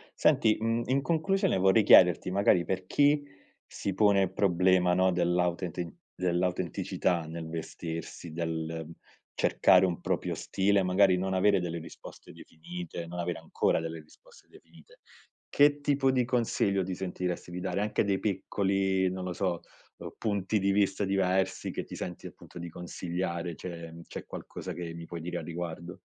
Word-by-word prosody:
Senti, 110 -1 +3
mhmm, 115 +1 0
in 135 +2 +1
conclusione 170 - +1
vorrei 95 +4 +4
chiederti 90 -2 +6
magari, 95 -3 +3
per 95 -1 -3
chi 145 +4 +3 0.4
si 100 - -4
pone 100 -1 +4
il 95 0 -3
problema, 90 -1 +3
no, 95 0 +3
dell'autenti 90 -1 -1 0.2
dell'autenticità 90 -1 -1
nel 80 0 -6
vestirsi, 80 0 -6
del 80 0 -3 0.5
cercare - - +4
un 90 -2 -2
proprio - - -1
stile, 100 +1 +1
magari 95 0 +4
non 95 +1 -1
avere 100 +1 +4
delle 85 -1 -3
risposte 80 0 -11
definite, 85 +1 -8
non 90 +1 -7
avere 85 -1 -2
ancora - - 0
delle 80 0 -5
risposte 75 - -21
definite. - - -19 0.5
Che 145 0 +4
tipo 140 -2 +2
di 130 -2 +2
consiglio 115 -5 +1
ti 90 0 -4
sentiresti 90 -1 -4
di 90 - -5
dare? 95 +2 -2
Anche 105 - +1
dei 100 -2 +1
piccoli, 95 -1 0
non 95 0 -5
lo 90 - -3
so, 90 -2 -1 0.4
uhm, - - -8
punti 100 -1 -1
di 100 -1 +1
vista 100 0 +1
diversi 95 -1 0
che - - -4
ti - - -9
senti 90 - -6
appunto - - -11
di 85 0 -6
consigliare. 85 0 -4
C'è 85 -1 -8
c'è - - -8
qualcosa - - -7
che 85 -2 -6
mi 85 0 -8
puoi 85 0 -7
dire 90 +2 -4
a - - -5
riguardo? 85 0 -6
90 Hz, 160 wpm, -29 LUFS, 85-100 Hz, 0.5 s, chiederti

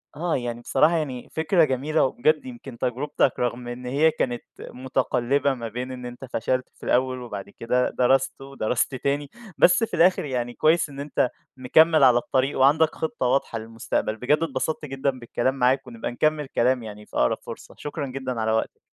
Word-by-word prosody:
آه، 165 +2 -1
يعني 120 -1 -3
بصراحة 160 +7 +3
يعني 130 -6 -4
فكرة 160 +2 +3
جميلة 150 +3 +1
وبجد 150 +4 +1
يمكن 125 0 -9
تجربتك 130 +3 0
رغم 120 0 -2
إن 120 +1 -7
هي 145 +6 +3
كانت 120 -5 -2 0.2
مُتقلبة 130 +1 0
ما 120 -3 -5
بين 125 +3 -5
إن 125 -1 -7
أنت 125 +2 -8
فشلت 130 +3 -1
في - - -20
الأول 130 0 +1
وبعد 105 -5 -7
كده 125 +4 0
درست 135 +2 +1
ودرست 135 -1 -1
تاني 140 +2 -1 0.3
بس 180 - +5
في 225 - -3
الآخر 185 0 +4
يعني 120 -3 -3
كويس 160 +4 +2
إن 140 -1 -10
أنت 140 -3 0 0.3
مكمّل 155 +4 +4
على 125 -2 +7
الطريق 130 +3 0
وعندك 150 +4 +4
خطّة 160 -5 -3
واضحة 125 -2 0
للمستقبل. 110 -1 -3
بجد 130 +6 +2
اتبسطت 155 +1 -2
جدًا 135 0 -1
بالكلام 120 +2 -1
معاك 130 +1 +2
ونبقى 115 -1 -5
نكمّل 155 +4 +1
كلام 125 -1 +1
يعني 105 -1 -9
في - - -16
أقرب - - +2
فرصة، - - -10
شكرًا 150 -1 -5
جدًا 130 -2 -4
على 110 0 +1
وقتك. 110 0 -1
130 Hz, 175 wpm, -24 LUFS, 120-145 Hz, 0.3 s, على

